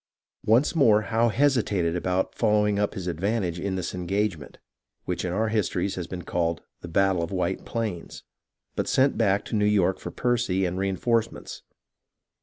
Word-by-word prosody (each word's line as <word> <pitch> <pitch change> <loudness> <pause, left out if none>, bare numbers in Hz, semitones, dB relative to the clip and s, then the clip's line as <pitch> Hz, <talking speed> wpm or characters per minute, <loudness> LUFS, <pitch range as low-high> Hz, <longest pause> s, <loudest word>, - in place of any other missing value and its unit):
Once 120 +9 +4
more 110 -8 +5
Howe 115 +3 +2
hesitated 110 -10 +1
about 90 +1 -1
following 105 -2 +2
up 105 +1 0
his 95 -4 -5
advantage 90 +1 -1
in 95 +1 -2
this 90 -2 -3
engagement, 90 -3 -2 0.5
which 90 -1 -2
in 90 - -2
our 110 +4 0
histories 100 -3 0
has 90 -2 -5
been 90 -2 -6
called 85 -1 -1
" - - -52
the - - -7
battle 95 0 +2
of 85 - -3
White - - -2
Plains," 110 -7 -4 0.5
but - - -1
sent 135 +1 +3
back 100 -2 +1
to - - -4
New 105 - +2
York 100 -3 +2
for - - -6
Percy 120 -6 0
and 90 +1 -2
reenforcements. 105 +4 -1
100 Hz, 170 wpm, -26 LUFS, 90-110 Hz, 0.5 s, more